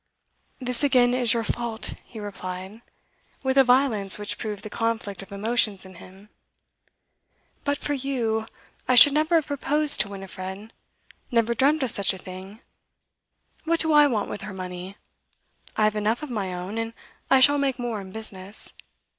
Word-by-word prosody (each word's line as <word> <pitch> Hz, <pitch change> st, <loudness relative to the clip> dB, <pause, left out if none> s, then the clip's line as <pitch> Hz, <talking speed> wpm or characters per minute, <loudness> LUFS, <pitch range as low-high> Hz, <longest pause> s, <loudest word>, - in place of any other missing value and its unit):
'This 250 Hz, -2 st, -2 dB
again 250 Hz, -4 st, +4 dB
is 250 Hz, -2 st, +2 dB
your 230 Hz, -1 st, +1 dB
fault,' 230 Hz, 0 st, -3 dB
he 225 Hz, -, -11 dB
replied, 195 Hz, 0 st, -7 dB, 0.6 s
with 265 Hz, 0 st, 0 dB
a 270 Hz, -, +7 dB
violence 245 Hz, -6 st, +2 dB
which 205 Hz, 0 st, -2 dB
proved 210 Hz, -2 st, -5 dB
the -, -, -6 dB
conflict 220 Hz, -3 st, -2 dB
of 195 Hz, -, -12 dB
emotions 210 Hz, -1 st, 0 dB
in 190 Hz, -, -12 dB
him. 195 Hz, +3 st, -15 dB, 1.4 s
'But 285 Hz, 0 st, 0 dB
for 290 Hz, -, -2 dB
you, 240 Hz, -5 st, -1 dB, 0.4 s
I 255 Hz, -, +4 dB
should 275 Hz, +4 st, +10 dB
never 310 Hz, +3 st, +2 dB
have 320 Hz, -3 st, +3 dB
proposed 290 Hz, 0 st, +2 dB
to 200 Hz, +1 st, +1 dB
Winifred 195 Hz, +1 st, -8 dB, 0.6 s
never 235 Hz, -1 st, +2 dB
dreamt 280 Hz, +5 st, +2 dB
of 250 Hz, -, +2 dB
such 200 Hz, -1 st, +2 dB
a -, -, -9 dB
thing. 190 Hz, +4 st, -10 dB, 1.0 s
What 330 Hz, 0 st, +2 dB
do 320 Hz, -1 st, +2 dB
I 295 Hz, -1 st, +7 dB
want 220 Hz, -7 st, -1 dB
with -, -, -6 dB
her 205 Hz, -1 st, -7 dB
money? 185 Hz, +1 st, -7 dB, 0.8 s
I 215 Hz, -, +3 dB
have 215 Hz, 0 st, +2 dB
enough 215 Hz, +6 st, 0 dB
of 295 Hz, -, -6 dB
my 200 Hz, -5 st, -3 dB
own, 180 Hz, +5 st, -5 dB
and 225 Hz, 0 st, -4 dB, 0.4 s
I 265 Hz, -, +6 dB
shall 285 Hz, +2 st, +6 dB
make 275 Hz, -2 st, 0 dB
more 240 Hz, -4 st, -3 dB
in 190 Hz, -1 st, -11 dB
business. 200 Hz, -1 st, -2 dB
225 Hz, 170 wpm, -25 LUFS, 200-260 Hz, 1.4 s, should